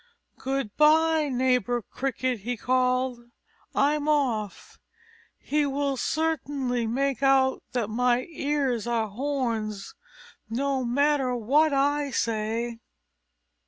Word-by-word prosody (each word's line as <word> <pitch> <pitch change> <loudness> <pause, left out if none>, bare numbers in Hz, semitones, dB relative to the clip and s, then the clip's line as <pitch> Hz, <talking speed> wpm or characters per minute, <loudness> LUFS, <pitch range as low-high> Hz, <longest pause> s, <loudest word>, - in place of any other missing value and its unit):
"Goodby, 300 +5 +2
neighbor 250 -2 +1
Cricket," 255 -1 -2
he 240 +4 -4
called. 255 +1 +1 0.6
"I'm 295 +1 +2
off. 240 -9 -1 0.6
He 300 +1 0
will 280 0 -1
certainly 275 -5 -1
make 270 +3 -1
out 270 -1 +3
that 240 -4 0
my 245 +3 +1
ears 280 -6 -1
are 230 -2 0
horns, 225 -4 -3 0.6
no 265 +3 -1
matter 270 +1 +1
what 285 +7 +3
I 285 +1 +1
say." 230 0 -2
260 Hz, 95 wpm, -26 LUFS, 235-285 Hz, 0.6 s, out